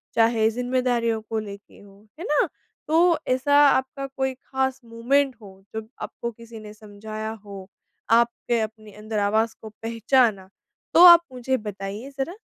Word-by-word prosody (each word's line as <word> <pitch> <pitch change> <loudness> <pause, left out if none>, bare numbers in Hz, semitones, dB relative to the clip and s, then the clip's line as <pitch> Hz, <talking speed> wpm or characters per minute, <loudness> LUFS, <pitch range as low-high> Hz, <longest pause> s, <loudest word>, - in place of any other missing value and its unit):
चाहे 225 -1 +3
ज़िम्मेदारियों 245 -2 -1
को 225 - -1
लेके 200 -1 -10
हो। 200 +1 -18
है - - -6
ना? 295 - +2 0.4
तो 335 +2 +4
ऐसा 260 +3 +1
आपका 270 +1 -1
कोई 265 -1 -3
ख़ास 265 0 -3
मोमेंट 255 +4 0
हो, 195 -2 -15
जो 220 0 -5
आपको 235 - -5
किसी 230 0 -12
ने 210 0 -11
समझाया 215 +1 -7
हो? 200 -3 -10 0.4
आपके 235 0 +2
अपने 215 -1 -7
अंदर 215 +1 -4
आवाज़ 220 +2 +1
को 220 - -9
पहचाना? 225 -2 0 0.4
तो 345 - +7
आप 345 -1 +10
मुझे 255 +1 -1
बताइए 205 +4 -7
ज़रा। 335 +8 -3
230 Hz, 150 wpm, -24 LUFS, 215-260 Hz, 0.4 s, आप